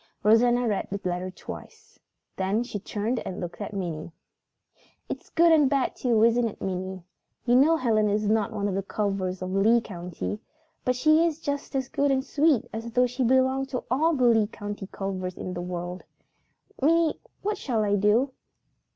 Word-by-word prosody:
Rosanna 240 +3 +4
read 205 -3 -1
the 200 - -3
letter 180 +1 -2
twice. 445 - -11 0.4
Then 195 +5 0
she 225 -4 -5
turned 220 +4 -2
and 185 - -6
looked 175 +3 -6
at 205 - -4
Minnie. 170 -5 -4 1.0
"It's - - -6
good 335 0 +4
and 300 -4 +5
bad 275 -2 0
too, 230 -4 +2
isn't 235 +1 +4
it, 215 - -8
Minnie? 185 -1 -4 0.4
You 245 0 +4
know 305 +6 +5
Helen 220 -6 +2
is 210 +1 0
not 215 0 +1
one 205 -2 -2
of 200 - -2
the 195 - 0
Culvers 195 -2 -2
of 185 - -4
Lee 220 +5 +4
County, 180 -1 -5 0.4
but 250 - +1
she 310 +5 +4
is 325 -2 0
just 285 -2 -4
as 265 -2 0
good 285 +1 0
and 265 -1 +1
sweet 295 -4 +2
as 225 +1 -5
though 250 +1 +4
she 250 +2 -2
belonged 260 +2 +2
to 250 - -3
all 315 +5 +3
the 255 -3 +2
Lee 225 -3 +4
County 205 -2 -7
Culvers 185 -2 -4
in 185 - -5
the 175 - -4
world. 180 0 -5 0.8
Minnie, 325 +2 +3 0.2
what 415 0 -1
shall 230 -5 0
I 205 -1 +2
do?" 210 +7 +3
225 Hz, 185 wpm, -26 LUFS, 195-265 Hz, 1.0 s, and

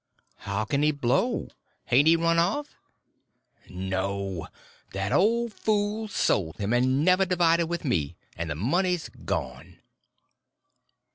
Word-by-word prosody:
"How 100 +2 -3
can 140 +4 0
he 150 - +4
blow? 145 - 0 0.4
Hain't 135 +5 +4
he 165 - +7
run 165 0 +2
off?" 210 +13 0 1.0
"No! 95 0 -3 0.5
That 95 +1 -2
old 230 +3 +2
fool 215 +1 -1
sold 95 - 0
him, 100 +3 -1
and 130 +4 +2
never 185 +1 +4
divided 170 -2 +2
with 170 -1 -4
me, 80 - -1 0.2
and 85 0 -4
the 75 - -2
money's 175 - 0 0.2
gone." - - -4
150 Hz, 125 wpm, -26 LUFS, -, 1.0 s, he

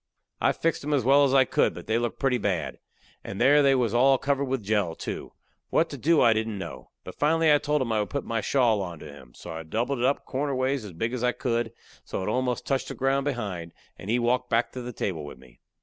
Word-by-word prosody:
I - - +3
fixed 165 -3 -1
'em 150 +1 0
as 135 - +1
well 140 +3 +5
as 135 - +1
I 135 -1 +6
could, - - +1
but - - -9
they 110 +1 +1
looked 120 -1 -2
pretty 130 -3 +1
bad, 100 -5 -2 0.4
and 95 - -6
there 145 +4 +6
they 135 -1 +4
was 120 -4 +1
all 135 +3 +5
covered 140 +1 0
with 130 -3 -2
jell, 100 -5 0
too. - - -6 0.4
What 165 - +1
to - - -5
do 160 +6 +3
I 115 -2 +6
didn't 110 -1 -2
know. 95 - -8
But - - -10
finally 160 +1 +4
I 145 - +4
told 150 -1 0
him 115 - -4
I 110 - +1
would 105 - -2
put 140 - -3
my 115 -1 -1
shawl 115 -3 +2
onto 85 -5 -7
him. 70 -5 -13
So 85 - -9
I 80 0 -5
doubled 115 - -2
it 120 - +1
up 140 +2 0
corner 140 +1 -2
ways 130 -2 -1
as 100 - -9
big 115 +8 -2
as 125 -1 -3
I 125 0 +2
could, 120 -3 -1 0.3
so - - -4
it 95 - -2
almost 125 +1 -1
touched 135 -1 -1
the - - -6
ground 135 +1 +1
behind, 100 -11 -4 0.2
and 95 - -10
he 120 - +3
walked 125 +1 0
back 115 +1 +1
to 125 - -6
the 125 0 -6
table 90 -8 -3
with 75 - -9
me. 65 -2 -19
125 Hz, 260 wpm, -26 LUFS, 105-135 Hz, 0.4 s, I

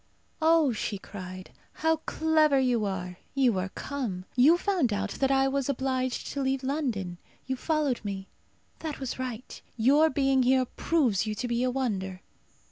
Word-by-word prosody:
"Oh!" 320 -4 +4
she 215 -1 -3
cried. 185 -1 -9 0.2
"How 320 0 +1
clever 315 -2 +2
you 245 -4 +2
are! 180 -2 -4 0.2
You 250 -8 +3
are 185 +1 -2
come. 215 -8 -4
You 285 +7 +6
found 355 - +1
out 205 0 -1
that 270 - +2
I 270 0 +3
was 275 0 -1
obliged 260 -1 -1
to 280 - -3
leave 265 0 0
London. 240 - -2 0.3
You 260 - -2
followed 295 -3 0
me. 195 -2 -5 0.5
That 315 -3 -5
was 265 -1 -4
right. 255 -2 -6 0.2
Your 285 +7 +5
being 270 -3 +2
here 255 +1 +3
proves 245 - +1
you 215 - -2
to 245 +4 -3
be 235 0 0
a 255 - +2
wonder." 195 -8 -2
255 Hz, 165 wpm, -28 LUFS, 210-280 Hz, 0.5 s, You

